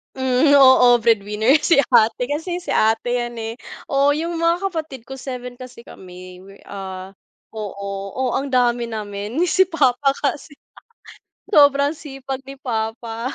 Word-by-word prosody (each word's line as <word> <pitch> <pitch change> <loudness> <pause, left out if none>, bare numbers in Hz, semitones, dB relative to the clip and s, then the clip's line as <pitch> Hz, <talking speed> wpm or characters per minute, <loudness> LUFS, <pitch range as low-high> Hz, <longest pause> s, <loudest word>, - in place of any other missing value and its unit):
Hmm, 260 +2 +2
oo, 255 -2 +6
breadwinner 220 +5 +2
si 330 - +3 0.2
ate, 225 +2 +4
kasi 325 +6 -3
si 355 - -6
ate 225 +2 +1
'yan, 240 -1 -3
eh. 225 0 -5 0.4
Oo, 280 +1 +3
'yung 335 +2 -3
mga 335 +1 +2
kapatid 310 -9 -5
ko, 270 - -9
7 250 -2 -7
kasi 245 -1 -12
kami. 180 0 -12
We 195 +1 -15
ah, 190 -1 -8 0.4
oo, 200 -2 -6
oh, 260 -2 -1
ang 275 0 -2
dami 245 -2 +1
namin. 210 +2 -6
Si 380 +2 +2
papa 275 -3 +2
kasi, 290 +1 -4 0.9
sobrang 285 -4 +5
sipag 270 -3 -7
ni 275 - -8
papa. 230 0 -4
245 Hz, 145 wpm, -20 LUFS, 220-280 Hz, 0.9 s, oo